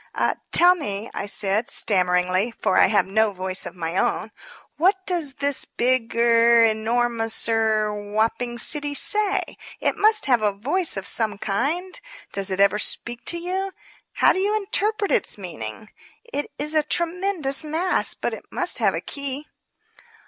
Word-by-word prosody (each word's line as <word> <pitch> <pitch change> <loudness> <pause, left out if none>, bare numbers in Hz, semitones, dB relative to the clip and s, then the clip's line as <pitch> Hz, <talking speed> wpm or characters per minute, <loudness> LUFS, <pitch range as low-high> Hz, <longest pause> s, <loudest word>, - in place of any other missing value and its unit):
"Tell 355 +1 +7
me," 220 - -5
I - - -5
said, 205 +2 -1
stammeringly, 185 +2 +2
for 185 - 0
I - - +6
have 205 +1 +2
no 220 +2 +1
voice 185 0 -1
of 180 - -10
my 170 0 -4
own, - - -1 0.5
"what 375 +3 +1
does 330 -7 -1
this 285 -1 0
big 245 -2 -1
er 235 0 +4
enormous 225 +1 0
er 220 -2 +1
whopping 220 +4 -2
city 290 +3 -2
say? 415 +4 0 0.2
It - - -1
must 430 +1 +4
have 250 -5 +2
a 210 -1 +1
voice 290 - -1
of 195 - -4
some 215 -3 0
kind. 310 - -3 0.3
Does 195 0 0
it 190 0 -3
ever 200 +1 +3
speak 240 +2 -1
to 345 - -2
you? 375 +3 -4 0.4
How - - +4
do - - -3
you 410 +2 0
interpret 420 0 -1
its - - +1
meaning? 170 - -8 0.4
It 290 - -2
is 300 +2 -2
a 310 - +3
tremendous 335 -2 +1
mass, 325 +4 +2
but - - -3
it - - -9
must - - +2
have - - +1
a - - -3
key." 280 +1 -5
240 Hz, 160 wpm, -22 LUFS, 205-335 Hz, 0.5 s, Tell